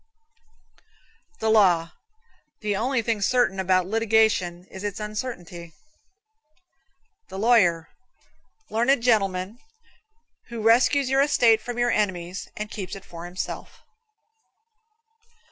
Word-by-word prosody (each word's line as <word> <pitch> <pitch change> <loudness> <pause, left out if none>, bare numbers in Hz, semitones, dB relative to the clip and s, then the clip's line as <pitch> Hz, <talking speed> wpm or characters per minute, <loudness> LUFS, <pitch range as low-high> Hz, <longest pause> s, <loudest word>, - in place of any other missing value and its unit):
The 220 0 +1
Law. 175 -6 +3 0.7
The 210 -2 -1
only 235 +3 0
thing 220 -2 -1
certain 225 -3 +1
about 185 -1 +2
litigation 220 -4 +1
is 190 - -9
its 205 -1 -4
uncertainty. 195 -6 -6 1.6
The - - -8
Lawyer 195 -7 +3 0.8
Learned 235 +3 +2
gentleman, 200 -2 0 0.9
who 235 -3 -6
rescues 255 +4 +3
your 270 +1 +4
estate 235 -6 +4
from 245 +1 -6
your 240 0 +1
enemies 180 -3 -2
and 210 0 -5
keeps 195 -3 -6
it 195 - -11
for 170 0 -10
himself. 180 +1 -7
210 Hz, 105 wpm, -24 LUFS, 185-235 Hz, 1.6 s, your